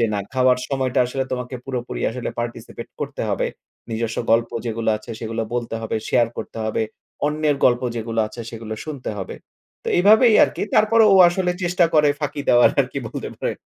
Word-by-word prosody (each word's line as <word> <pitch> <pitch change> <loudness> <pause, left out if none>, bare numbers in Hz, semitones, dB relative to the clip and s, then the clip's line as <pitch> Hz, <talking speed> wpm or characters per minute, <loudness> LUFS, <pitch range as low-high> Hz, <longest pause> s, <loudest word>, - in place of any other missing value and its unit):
যে, - - +4
"না - - 0
খাওয়ার 130 -1 +3
সময়টা 130 -1 0
আসলে 130 +2 -2
তোমাকে 125 0 -4
পুরোপুরি 125 -2 -4
আসলে 125 +1 -4
participate 120 0 -6
করতে 145 -1 -4
হবে। 100 - 0 0.4
নিজস্ব 115 0 -2
গল্প 115 +1 +3 0.2
যেগুলা 115 -1 0
আছে 110 +2 -12
সেগুলা 115 0 -3
বলতে 120 -2 -2
হবে, 110 - -2
শেয়ার 120 -2 +3
করতে - - -7
হবে। 110 0 -1 0.4
অন্যের 150 -1 +1
গল্প 120 0 +4
যেগুলা 115 0 -1
আছে 120 - -9
সেগুলো 110 -1 -6
শুনতে 145 -7 -5
হবে।" 95 - -6 0.5
তো - - -3
এভাবেই 215 +5 +6
আরকি - - -4
তারপরেও, 215 +1 +5
ও - - +6
আসলে 180 0 0
চেষ্টা 175 +1 +2
করে 150 -1 +5
ফাঁকি 150 -1 -3
দেওয়ার 120 0 +6
আরকি - - -2
বলতে - - -5
পারেন। - - -3
125 Hz, 180 wpm, -21 LUFS, 115-150 Hz, 0.5 s, এভাবেই